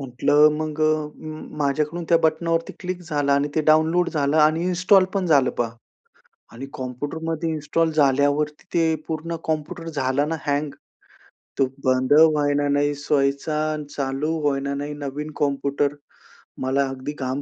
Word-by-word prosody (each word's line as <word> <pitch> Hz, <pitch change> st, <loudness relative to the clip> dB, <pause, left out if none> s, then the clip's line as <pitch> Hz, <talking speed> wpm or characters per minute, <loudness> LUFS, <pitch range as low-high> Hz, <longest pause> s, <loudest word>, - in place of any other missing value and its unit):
म्हटलं 145 Hz, +3 st, +3 dB
मग 155 Hz, 0 st, -4 dB
अ, 155 Hz, -1 st, +1 dB, 0.5 s
माझ्याकडून 150 Hz, +4 st, -1 dB
त्या 170 Hz, -, +6 dB
बटनवरती 165 Hz, +1 st, 0 dB
क्लिक 180 Hz, -1 st, -4 dB
झाला 145 Hz, -4 st, 0 dB
आणि 140 Hz, +1 st, +1 dB
ते 160 Hz, -, +2 dB
डाउनलोड 160 Hz, +3 st, +3 dB
झालं 145 Hz, -1 st, 0 dB
आणि 155 Hz, +3 st, +3 dB
इन्स्टॉल 185 Hz, +2 st, +4 dB
पण 190 Hz, -2 st, 0 dB
झालं 140 Hz, -6 st, +4 dB
पहा 115 Hz, -1 st, 0 dB, 0.8 s
आणि 125 Hz, +4 st, -8 dB
कॉम्प्युटरमध्ये 155 Hz, +6 st, -4 dB
इन्स्टॉल 160 Hz, +1 st, 0 dB
झाल्यावरती 145 Hz, +1 st, +1 dB
ते 165 Hz, -1 st, +3 dB
पूर्ण 165 Hz, +1 st, -3 dB
कॉम्प्युटर 160 Hz, +1 st, -3 dB
झाला 140 Hz, -1 st, 0 dB
ना 165 Hz, +1 st, -2 dB
हँग. 145 Hz, 0 st, 0 dB, 0.9 s
तो 135 Hz, -, +5 dB, 0.2 s
बंद 130 Hz, +2 st, +2 dB
होईना 145 Hz, -2 st, +4 dB
नाही 145 Hz, +1 st, +2 dB
सोईचा 140 Hz, +1 st, 0 dB, 0.2 s
आणि 150 Hz, -1 st, -5 dB
चालू 140 Hz, +3 st, -2 dB, 0.2 s
होईना 140 Hz, 0 st, -1 dB
नाही, 145 Hz, +1 st, -4 dB
नवीन 145 Hz, +1 st, -5 dB
कॉम्प्युटर. 140 Hz, 0 st, 0 dB, 0.7 s
मला 135 Hz, +2 st, +1 dB
अगदी 135 Hz, +2 st, -6 dB
घाम 130 Hz, +1 st, -2 dB
150 Hz, 140 wpm, -23 LUFS, 140-160 Hz, 0.9 s, त्या